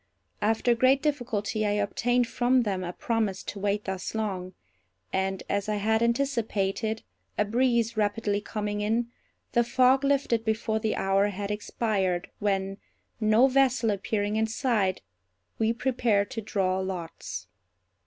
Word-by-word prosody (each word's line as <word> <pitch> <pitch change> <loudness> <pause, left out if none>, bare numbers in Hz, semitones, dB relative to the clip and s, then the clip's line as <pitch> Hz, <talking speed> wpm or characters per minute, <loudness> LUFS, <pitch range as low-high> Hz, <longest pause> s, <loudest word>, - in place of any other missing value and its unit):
After 225 +3 +2
great 260 +4 +3
difficulty 235 -8 -1
I 205 -1 +1
obtained 240 +4 +1
from 245 +1 +2
them 195 -4 -2
a 175 - -3
promise 215 -1 -1
to 205 - -6
wait 205 +1 -1
thus 190 +2 -4
long; 190 -4 -3 0.6
and, 190 0 -1
as 200 +1 -1
I 210 - +1
had 220 +2 +1
anticipated 225 -4 0 0.3
(a 210 - +2
breeze 235 0 +1
rapidly 205 -1 0
coming 210 -1 -3
in), 230 +3 0 0.4
the 240 - +3
fog 255 +3 +4
lifted 275 -5 +2
before 220 0 0
the 220 -1 -1
hour 195 +1 +2
had 205 0 -4
expired, 205 -4 -1
when, 195 -1 -1 0.4
no 215 +3 +5
vessel 260 -4 +3
appearing 205 +1 -1
in 220 0 +2
sight, 220 -5 0 0.6
we 220 0 +3
prepared 235 -4 +1
to 230 -4 -3
draw 190 -3 0
lots. 165 - -5
215 Hz, 140 wpm, -27 LUFS, 200-235 Hz, 0.6 s, no